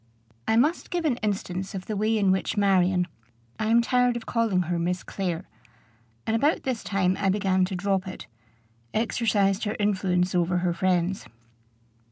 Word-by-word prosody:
I 220 - +3
must 295 +9 +2
give 350 -2 -2
an 265 -6 +1
instance 195 -3 -3
of 185 - -5
the 215 - -3
way 215 +2 +1
in 195 -3 +3
which 190 +2 -1
Marion 185 -2 +3 0.5
I 215 - 0
am 230 +1 +4
tired 250 0 +2
of 230 - -8
calling 225 -6 +1
her 175 0 -2
Miss 180 +2 -1
Clare, 180 -4 -3 0.8
and 220 - 0
about 290 +8 +2
this 255 -4 -2
time 190 -2 +1
I 195 - +2
began 190 -1 +2
to 190 +1 -4
drop 190 +1 0
it 185 - -7 0.7
exercised 210 -3 +1
her 210 - -2
influence 190 -3 +1
over 180 0 +1
her 175 -1 0
friends. 185 +1 0
195 Hz, 170 wpm, -26 LUFS, 185-220 Hz, 0.8 s, am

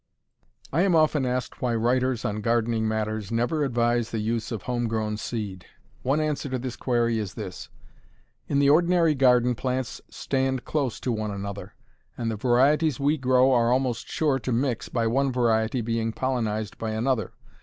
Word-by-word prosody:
I 165 - +3
am 190 -2 +3
often 155 -4 +3
asked 125 0 -3
why 120 -2 0
writers 125 +1 +1
on 105 +1 -2
gardening 115 0 +1
matters 110 -1 -2
never 120 +7 0
advise 120 -3 +1
the 115 - -3
use 110 +1 -2
of 110 -5 -4
home 120 -1 -1
grown 110 -1 -1
seed. 105 -5 -5 0.3
One 135 +4 +1
answer 150 -2 -1
to 130 - -1
this 125 0 -5
query 120 -2 0
is 105 -1 -5
this: 95 -5 -7 0.8
In 140 - 0
the 140 0 +4
ordinary 170 +2 +4
garden 125 -3 +4
plants 130 0 -3
stand 130 -1 -1
close 140 -6 -1
to 125 - -1
one 110 -2 -2
another, 100 0 -6 0.4
and 115 -1 -2
the - - -2
varieties 135 +6 +2
we 145 +2 +2
grow 130 -1 +3
are 120 -2 +3
almost 125 -3 0
sure 145 -4 0
to 130 - -4
mix, 120 0 -1
by 115 -2 0
one 135 +4 +1
variety 120 -1 +1
being 115 0 -1
pollenized 110 -5 -2
by 110 -1 -3
another. 115 +1 -1
120 Hz, 175 wpm, -25 LUFS, 110-130 Hz, 0.8 s, the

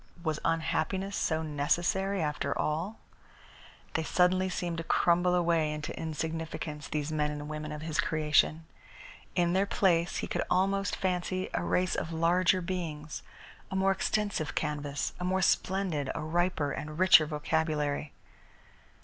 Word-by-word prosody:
Was 155 -3 -1
unhappiness 185 +4 0
so 160 -1 0
necessary, 175 +6 0
after 150 -1 -1
all? 165 +8 -1 1.0
They 160 - +1
suddenly 185 +3 +2
seemed 175 -2 -3
to - - -3
crumble 175 +2 +3
away 165 -3 +2
into 150 +1 -5
insignificance, 160 -1 -4
these 150 0 -2
men 150 -1 +1
and 150 0 -5
women 155 0 -5
of 150 0 -6
his 160 -1 -3
creation. 155 +1 +2 0.7
In 175 -1 +2
their 195 +2 +2
place 175 -4 +2
he - - -2
could - - -2
almost 195 +1 +1
fancy 185 0 -1
a - - 0
race 180 0 +1
of 165 - -2
larger 175 +3 +3
beings, 160 -4 -4 0.5
a - - -4
more 190 0 +3
extensive 205 -5 -1
canvas, 145 -2 -2
a - - -4
more 185 +1 +1
splendid, 180 -8 +1
a 165 - -3
riper 160 -2 0
and 150 +2 -5
richer 175 -4 +7
vocabulary. 150 -1 -1
165 Hz, 140 wpm, -30 LUFS, 150-185 Hz, 1.0 s, richer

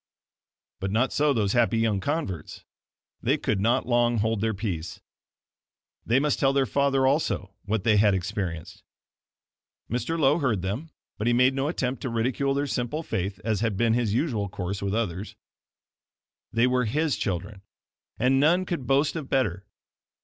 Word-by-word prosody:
But 95 - -2
not 115 +6 +1
so 150 0 +3
those 105 -6 +1
happy 120 -1 +3
young 110 -3 +1
converts. 100 - -4 0.6
They - - +2
could 105 - -1
not 115 +4 +2
long 120 -1 +2
hold 110 0 0
their 110 -1 0
peace. 90 -5 -4 1.1
They 120 +3 +4
must 150 +1 0
tell 135 0 +3
their 135 -1 +3
father 135 +2 +2
also 130 - 0
what 105 -1 -1
they 110 -1 +4
had 100 -1 +4
experienced. 90 -3 -4 1.1
Mr. 165 +8 -1
Lowe 145 +2 +4
heard 115 - 0
them, 110 +13 -3 0.3
but 105 - -1
he 120 - +4
made 125 +2 +4
no 135 +1 -1
attempt 130 -5 -2
to 130 - -3
ridicule 125 +4 0
their 140 +1 0
simple 130 +4 -2
faith, 95 - -3
as 110 -3 0
had 110 -3 -1
been 115 +1 +3
his 115 -3 +1
usual 115 -5 0
course 95 +1 -4
with 100 +1 -1
others. 105 -3 -3 1.2
They 115 +2 +3
were 125 -1 +2
HIS 150 +5 0
children, 95 +1 -3 0.6
and 130 +3 +3
none 175 +6 +3
could 170 -8 -4
boast 140 +3 +2
of 155 -5 -5
better. 105 -7 0
115 Hz, 165 wpm, -26 LUFS, 100-135 Hz, 1.2 s, They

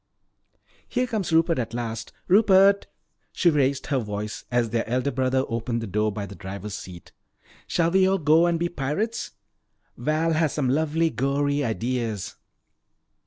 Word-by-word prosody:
"Here 250 0 0
comes 215 -8 -3
Rupert 165 -1 +3
at 115 -1 -3
last. 115 -2 -4 0.2
Rupert," 200 0 +5 0.5
she 175 - +3
raised 140 -2 +1
her 135 -2 0
voice 105 -1 -5
as 120 -2 0
their 115 -1 -1
elder 130 +3 0
brother 130 0 +1
opened 115 0 -2
the 115 - -4
door 105 +2 0
by 105 0 -4
the 100 - -10
driver's 100 +1 -7
seat, 90 -3 -9 0.6
"shall 170 -1 +1
we 190 +1 +4
all 195 - +2
go 160 +1 +4
and 170 -1 +1
be 170 +1 0
pirates? 175 - -3 0.6
Val 160 +2 0
has 155 -2 +1
some 135 -4 0
lovely 160 +3 +1
gory 140 +4 0
ideas." 115 -3 -2
140 Hz, 155 wpm, -25 LUFS, 115-165 Hz, 0.6 s, Rupert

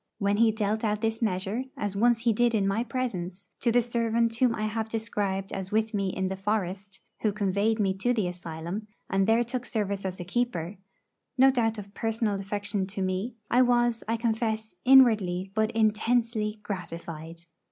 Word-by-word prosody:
When 200 0 +1
he 225 0 +5
dealt 215 0 -1
out 210 -1 0
this 225 0 -1
measure, 205 +3 -1
as 205 -1 -3
once 235 +2 +3
he 230 -1 +3
did 235 +1 +2
in 200 -2 +2
my 210 +4 +1
presence, 200 -7 -4
to 235 - +2
the 245 +1 +4
servant 230 -1 +1
whom 245 -2 +3
I 215 - -3
have 220 +1 -2
described 205 -4 -2
as 190 -1 -5
with 220 +1 +1
me 195 -2 0
in 190 0 -2
the 190 - -3
forest, 195 0 -3 0.2
who 215 - +1
conveyed 205 +2 +1
me 195 -2 +2
to 245 +5 +1
the 215 -7 +1
asylum, 175 +3 -5 0.2
and 195 0 +2
there 225 +2 +4
took 245 +1 -4
service 200 -4 -2
as 190 -1 -4
a - - -3
keeper 185 -3 -2 0.6
no 265 +1 +7
doubt 225 -3 0
of 200 -1 -9
personal 225 -1 -1
affection 205 0 -2
to 195 0 -3
me 190 +6 -2 0.2
I 245 - +5
was, 240 -2 +2
I 230 +1 0
confess, 220 -1 -1
inwardly 210 -8 +5
but 220 +1 +1
intensely 220 0 +1
gratified. 165 -3 -6
215 Hz, 185 wpm, -27 LUFS, 195-230 Hz, 0.6 s, no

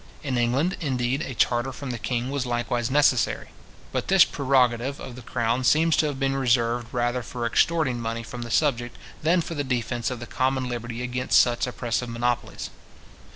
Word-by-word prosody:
In 135 -4 -2
England, 130 +10 +1
indeed, 130 -2 0
a 130 - -5
charter 120 +3 +1
from 130 +1 -6
the 120 - -5
king 125 +2 -2
was 140 -3 -2
likewise 120 0 -1
necessary. 135 -3 +2 0.4
But - - -2
this 190 -2 +7
prerogative 130 -1 +1
of 120 - -8
the 125 - -9
crown 120 +1 -1
seems 160 +5 +4
to 155 - +3
have 140 -3 -4
been 135 0 +1
reserved 120 -2 +1
rather 120 0 0
for 120 +1 -5
extorting 130 0 +2
money 115 0 -3
from 120 +2 -8
the 120 - -6
subject, 120 -2 0 0.2
than 170 +3 +3
for 165 - -5
the 145 -3 -2
defence 120 -2 -1
of 125 -2 -5
the 120 - -6
common 130 +1 0
liberty 120 0 -4
against 125 +1 +2
such 120 0 +2
oppressive 120 0 -2
monopolies. 120 +1 -2
125 Hz, 185 wpm, -25 LUFS, 120-135 Hz, 0.4 s, this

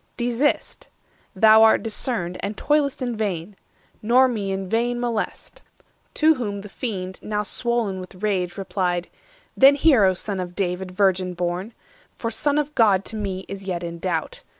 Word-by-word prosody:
Desist 245 +4 -1 0.5
(thou 220 +2 +7
art 225 0 +5
discerned, 215 -5 -2
And 205 +1 -4
toil'st 290 -3 +1
in 245 -2 -2
vain), 200 -3 -3 0.5
nor 250 +4 +5
me 210 -6 -2
in 190 0 -3
vain 240 +4 0
molest." 235 -3 -4 0.5
To 315 +1 +5
whom 205 -7 -4
the 210 - -10
Fiend, 190 -5 -5
now 210 0 -2
swoln 230 -3 -1
with 185 +1 -11
rage, 185 -4 -1
replied:— 180 -2 -2 0.5
"Then 275 +1 +7
hear, 275 -8 +5
O 185 -1 +3
Son 195 +1 -3
of 180 -1 -5
David, 185 -1 -2
virgin 185 -1 +1
born! 175 +1 -2 0.5
500 - - -40
For 230 - -4
Son 290 +5 0
of 300 0 -1
God 200 -6 +3
to 225 - -4
me 195 -3 -4
is 195 0 -8
yet 180 -2 -3
in 170 0 -6
doubt. 190 - -3
205 Hz, 170 wpm, -23 LUFS, 185-240 Hz, 0.5 s, thou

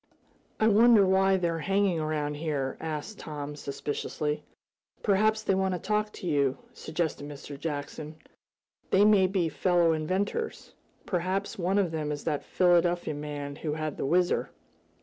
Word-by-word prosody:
"I 220 - +4
wonder 225 -1 +6
why 190 0 +4
they're 170 -2 -1
hanging 195 -1 +1
around 155 -1 -1
here?" 145 -3 -2
asked 160 +6 -5
Tom, 150 -1 -6
suspiciously. 150 +1 -3 0.6
"Perhaps 215 +2 +2
they 195 - +2
want 190 -1 +1
to - - -4
talk 210 +2 0
to - - -9
you," 140 -4 +2 0.2
suggested 155 -3 -3
Mr. 145 0 -8
Jackson. 150 +1 -5 0.7
"They 200 +2 +5
may 205 -3 +5
be 185 -3 0
fellow 175 0 +2
inventors 190 - -2 0.3
perhaps 185 +3 -2
one 185 +3 +1
of 190 -5 +2
them 155 -2 -2
is 145 -1 -4
that 150 -3 -1
Philadelphia 175 -2 +2
man 145 -1 -5
who 155 -2 -3
had 155 -1 -3
the - - -2
Whizzer." 175 +3 +2
170 Hz, 150 wpm, -28 LUFS, 150-190 Hz, 0.7 s, wonder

